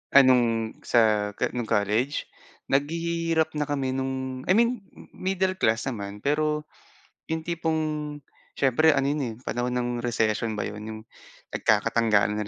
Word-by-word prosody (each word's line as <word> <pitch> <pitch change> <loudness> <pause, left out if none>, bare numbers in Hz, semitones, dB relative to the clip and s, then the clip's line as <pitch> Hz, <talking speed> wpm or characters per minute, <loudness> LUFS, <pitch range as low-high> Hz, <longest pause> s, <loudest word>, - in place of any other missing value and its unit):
Anong 120 -4 +5
sa 105 -3 +3
ka - - -1
nung 120 -2 -3
college? 110 +6 0 0.4
Naghihirap 165 +2 +1
na 150 - 0
kami 135 -3 -1
nung 130 0 -3
I 185 - +4
mean 235 +2 +3 0.3
middle 190 0 -1
class 110 -5 +2
naman, 105 -4 -5
pero 150 +1 +1 0.7
yung 160 0 -2
tipong 155 -3 -2 0.4
siyempre 140 +4 +4
ano 135 - +2
yun, 150 - -2
eh, - - -12
panahon 120 +1 -1
ng 120 0 -1
recession 110 -2 0
ba - - -1
yun? 105 0 -6
Yung 110 0 -7 0.5
nagkakatanggalan 110 -1 +2
na 105 - -2
130 Hz, 140 wpm, -26 LUFS, 110-155 Hz, 0.7 s, Anong